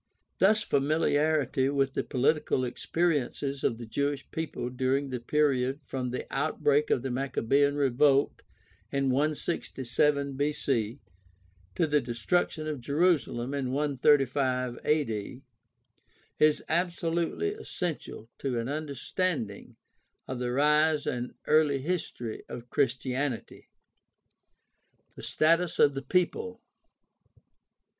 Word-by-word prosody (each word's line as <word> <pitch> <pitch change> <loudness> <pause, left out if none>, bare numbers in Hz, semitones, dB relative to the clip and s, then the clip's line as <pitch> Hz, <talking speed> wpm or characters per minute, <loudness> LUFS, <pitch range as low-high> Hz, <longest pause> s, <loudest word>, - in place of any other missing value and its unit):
Thus 215 +3 +4
familiarity 145 - +1
with 135 -1 +1
the - - -1
political 140 0 +1
experiences 140 0 -1
of 115 - +1
the 120 - -7
Jewish 140 +5 -2
people 155 -6 -4
during 130 +2 0
the 125 - -2
period 135 0 +1
from 130 -2 -3
the 125 - -4
outbreak 145 0 +1
of 120 - +1
the 135 - -2
Maccabean 140 +2 +1
revolt 140 0 +3 0.5
in 140 -1 +1
167 140 -1 0
B.C. 135 -4 -1 0.8
to - - +2
the 150 -1 +2
destruction 155 +7 -1
of 150 -4 -4
Jerusalem 140 -4 +1
in 135 -3 -2
135 135 -3 +2
a.d. 125 -4 -1 1.0
is 155 0 +4
absolutely 170 - 0
essential 175 - -5
to 130 -3 -2
an 115 0 -2
understanding 145 - -3 0.5
of 130 -1 -4
the 125 -1 -1
rise 150 +3 +3
and 125 0 -3
early 150 -2 +4
history 135 -7 -4
of 120 0 -8
Christianity. 130 -1 -2 1.4
The - - -11
status 165 +2 +2
of 145 - +5
the 135 - -4
people. 180 - -1
140 Hz, 105 wpm, -29 LUFS, 125-155 Hz, 1.4 s, of